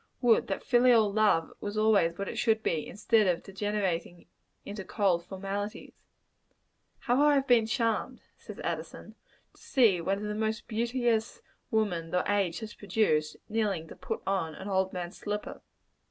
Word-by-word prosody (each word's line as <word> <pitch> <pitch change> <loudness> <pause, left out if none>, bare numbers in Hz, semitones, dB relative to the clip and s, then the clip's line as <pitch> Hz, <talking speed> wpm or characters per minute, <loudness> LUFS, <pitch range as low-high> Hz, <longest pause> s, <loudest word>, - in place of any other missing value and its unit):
Would 240 -3 +3
that 195 - -3
filial 240 -4 +4
love 205 -6 +2
was 205 +1 -5
always 200 -6 +3
what 200 - -3
it - - -5
should 225 -2 +2
be, 160 -3 -1
instead 210 +1 +2
of 175 -2 0
degenerating 195 -4 -3 0.4
into 205 -1 -6
cold 185 -3 +1
formalities. 195 +2 -6 0.9
"How 245 +1 +1
have 295 +2 +5 0.2
I - - -23
been 235 -4 +4
charmed;" 230 -1 -1
says - - -11
Addison, - - -5 0.4
"to - - -23
see 220 -10 +3
one 195 +4 0
of 205 - -6
the 210 0 -3
most 220 0 -2
beauteous 235 - -1 0.3
women 200 -8 0
the 180 +2 +1
age 200 -2 0
has 220 -1 -7
produced, 155 -8 0
kneeling 205 -7 -1
to - - -10
put - - -5
on 190 -5 -1
an 190 - -8
old 190 -1 +1
man's 175 -1 -6
slipper." 210 0 -5
205 Hz, 160 wpm, -29 LUFS, 190-220 Hz, 0.9 s, have